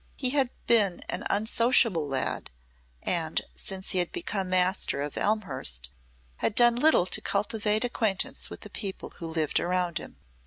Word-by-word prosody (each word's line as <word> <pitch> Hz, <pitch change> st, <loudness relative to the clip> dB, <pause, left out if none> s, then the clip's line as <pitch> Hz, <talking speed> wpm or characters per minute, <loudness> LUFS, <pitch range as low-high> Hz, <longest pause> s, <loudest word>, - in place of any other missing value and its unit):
He 255 Hz, -2 st, 0 dB
had 270 Hz, -3 st, +2 dB, 0.2 s
been 205 Hz, -6 st, +3 dB
an -, -, -3 dB
unsociable 220 Hz, -, +3 dB
lad, 135 Hz, -1 st, -1 dB, 0.5 s
and 165 Hz, -3 st, 0 dB
since 190 Hz, -1 st, -3 dB
he 185 Hz, -, +2 dB
had 175 Hz, -, 0 dB
become 205 Hz, -, -3 dB
master 185 Hz, -4 st, +2 dB
of 145 Hz, -, -6 dB
Elmhurst 130 Hz, -, 0 dB, 0.5 s
had 210 Hz, -, -1 dB
done 240 Hz, -1 st, +6 dB
little 275 Hz, -, +4 dB
to -, -, +1 dB
cultivate 210 Hz, +1 st, 0 dB
acquaintance 220 Hz, -5 st, -1 dB
with -, -, -8 dB
the -, -, -11 dB
people 195 Hz, -3 st, -6 dB
who 165 Hz, -, -5 dB
lived 160 Hz, -2 st, 0 dB
around 180 Hz, -2 st, -1 dB
him. -, -, -10 dB
195 Hz, 155 wpm, -27 LUFS, 170-225 Hz, 0.5 s, done